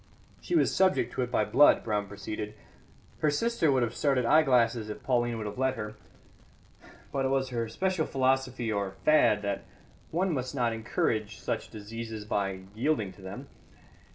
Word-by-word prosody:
"She 355 - -2
was 325 - +3
subject 185 -10 +2
to - - -2
it 125 - -1
by - - +1
blood," 145 - +5
Brown 105 -2 -1
proceeded. 105 +1 -6 0.6
"Her 155 - +3
sister 170 0 +1
would 130 -2 +3
have 120 -1 -2
started 135 -2 +1
eyeglasses 120 -6 +3
if 105 - -7
Pauline 120 -2 +1
would 110 - -4
have 105 +4 -6
let 130 0 +1
her; 105 -1 -5 1.2
but 135 - -1
it - - +2
was 135 -1 0
her 115 -2 -2
special 185 +5 -1
philosophy 130 -3 0
or 100 -2 -2
fad 150 -9 +4
that 100 -1 -2 0.5
one 180 +2 0
must 130 0 -3
not 120 -3 +1
encourage 110 -1 -1
such - - -3
diseases 110 0 -7
by 95 -2 -1
yielding 110 -3 0
to - - -17
them. 95 +1 -8
120 Hz, 170 wpm, -29 LUFS, 105-135 Hz, 1.2 s, blood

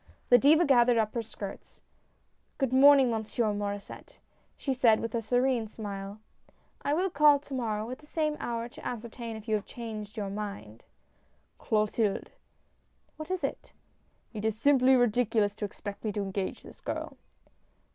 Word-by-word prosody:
The 245 - +8
Diva 310 +7 +5
gathered 245 -4 +5
up 215 -1 +1
her 235 - -1
skirts. 205 -3 -9 0.4
" - - -43
Good 265 -3 0
morning, 270 -1 +7
Monsieur 220 0 -1
Maur^sset," 205 0 -6 0.4
she 270 - -1
said 235 -4 +4
with 230 - -4
a 235 - 0
serene 245 0 +1
smile. 200 -1 -7 0.6
"I 290 - 0
will 370 +3 0
call 295 -1 +6
to 280 0 -11
morrow 220 -4 -2
at 255 - -6
the 300 - -18
same 305 -1 -1
hour, 235 -1 -3
to 245 - -14
ascertain 235 0 -6
if 220 +1 -10
you 220 - 0
have 210 -2 0
changed 215 -3 -7
your 200 -2 -3
mind." 200 - -6 0.8
"Clotilde!" 215 -1 0 0.9
"What 310 +2 -7
is 370 -1 -2
it?" - - -4 0.3
" - - -40
It 215 -2 -5
is 220 -1 0
simply 265 0 +5
ridiculous 225 -3 +2
to 210 0 -4
expect 205 0 -8
me 215 - -1
to 205 - -2
engage 195 0 -4
this - - -14
girl." - - -5
230 Hz, 165 wpm, -29 LUFS, 210-260 Hz, 0.9 s, The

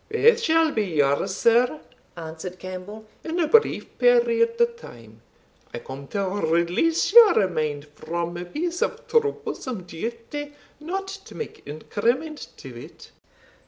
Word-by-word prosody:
"Both 455 +1 +5
shall 325 -6 +3
be 220 - 0
yours, 155 +1 +1
sir," 245 +6 +3 0.4
answered 165 +2 -7
Campbell, 185 +4 -8 0.2
"in 330 +2 -3
a 325 - +2
brief 450 +8 +2
period 470 -1 +3
of 470 0 +3
time. 115 - -14 0.5
I - - -3
come 135 +3 -9
to 200 +4 -2
release 185 - +1
your 440 - +8
mind 150 -4 -2
from 170 +3 -5
a 175 +1 -5
piece 340 - -3
of - - -2
troublesome 425 - -1
duty, 230 - -6 0.3
not 380 +6 -4
to 390 0 -10
make 455 - -7
increment 235 - -2
to - - -10
it." - - -14
230 Hz, 135 wpm, -24 LUFS, -, 0.5 s, your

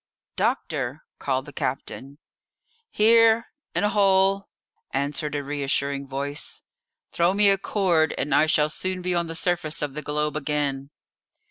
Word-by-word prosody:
"Doctor!" - - -2 0.2
called - - -1
the - - -11
captain. 140 +2 -4 0.7
"Here, 225 +1 +5 0.3
in - - +1
a 205 - +3
hole," 195 -1 +3 0.4
answered 145 +2 -2
a 145 - -2
reassuring 140 -1 -1
voice; 140 +2 -5 0.5
"throw 175 +3 +2
me 205 0 +6
a 195 - +3
cord, 175 -7 +1
and 140 +1 -1
I 155 +2 +4
shall 150 -1 +2
soon 185 +2 -3
be 180 0 0
on 170 -1 0
the 165 - -6
surface 165 -4 -1
of 145 -2 -3
the 150 - -4
globe 150 0 -2
again." 145 -2 -2
155 Hz, 145 wpm, -24 LUFS, 145-190 Hz, 0.7 s, me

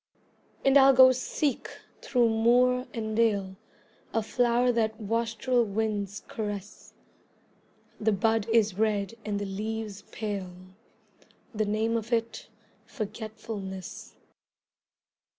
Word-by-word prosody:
And 270 +1 +7
I'll 270 0 +7
go 260 0 +9
seek 260 +2 -2 0.3
through 245 -3 +2
moor 245 +3 +3
and 220 -2 -4
dale 200 -4 +1 0.6
A 225 - +2
flower 245 +2 +2
that 220 -1 -1
wastrel 230 +3 0
winds 205 -1 -2
caress; 210 -6 -6 1.0
The 220 0 +2
bud 220 +2 +1
is 220 -4 +2
red 210 -1 0
and 210 -1 -2
the 205 - -3
leaves 210 +1 -4
pale, 200 -4 -4 1.0
The 215 0 0
name 220 +2 0
of 225 +1 -6
it 230 -1 -2 0.3
Forgetfulness. 215 -4 -7
220 Hz, 105 wpm, -28 LUFS, 205-235 Hz, 1.0 s, go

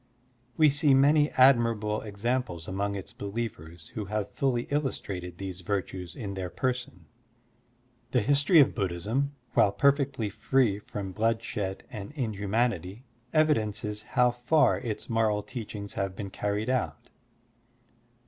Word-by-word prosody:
We 155 - +6
see 145 -1 +4
many 145 +2 +5
admirable 115 -5 +4
examples 110 -4 -2
among 100 +1 -2
its 95 - -7
believers 100 -6 -6
who 105 - -5
have 105 0 -3
fully 125 -3 0
illtistrated 95 - -3
these 95 -1 -6
virtues 95 -3 -3
in 100 -4 -5
their 95 -2 -4
person. 125 - -3 1.0
The 125 0 +2
history 145 - +4
of 140 - +5
Buddhism, 105 +9 -1 0.2
while 100 - +5
perfectly 140 -2 +2
free 105 0 +1
from 100 -2 -6
bloodshed 110 -2 -1
and 105 +1 -7
inhumanity, 110 - -1 0.3
evidences 110 -9 +1
how 125 +3 +2
far 125 +6 +3
its 110 -3 -5
moral 110 -2 +1
teachings 105 -4 -6
have 95 -1 -2
been 100 -1 -6
carried 105 +5 -1
out. 130 -2 -2
110 Hz, 125 wpm, -28 LUFS, 100-130 Hz, 1.0 s, We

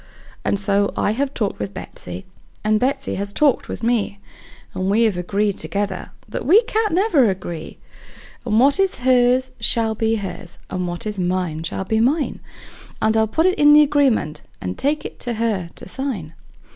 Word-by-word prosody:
And - - +1
so 200 0 +2
I - - +2
have 270 +5 -1
talked 215 -7 -2
with 100 -1 -5
Betsey, 90 0 -7 0.4
and 215 0 +2
Betsey 265 +4 -1
has 200 0 -4
talked 280 +4 +2
with - - -6
me, 225 -4 0 0.5
And 185 +1 -2
we 220 +4 +3
have 220 -4 +2
agreed 200 +3 -1
together 200 -2 -3 0.2
that 215 - -5
we 375 - +6
can't 440 -6 0
never 345 - +4
agree; 175 -4 -5 0.7
And 220 -2 +2
what 280 +7 +4
is 385 -8 +1
hers 255 0 +4
shall 225 0 +1
be 225 +1 0
hers, 185 -4 -6
and 180 -1 -2
what 175 +2 -5
is 210 -2 -4
mine 180 -3 -1
shall 165 +3 -3
be 220 +3 +1
mine; 280 +6 +1 0.6
And 220 0 +2
I'll 220 0 +3
put 320 +10 +1
it 370 0 +2
in 295 0 +7
the 300 0 +8
agreement, 275 - +1 0.2
and 90 0 -4
take 295 +2 0
it - - -7
to 240 - -2
her 215 -6 -1
to - - -10
sign. 200 - -4
220 Hz, 185 wpm, -21 LUFS, 190-270 Hz, 0.7 s, the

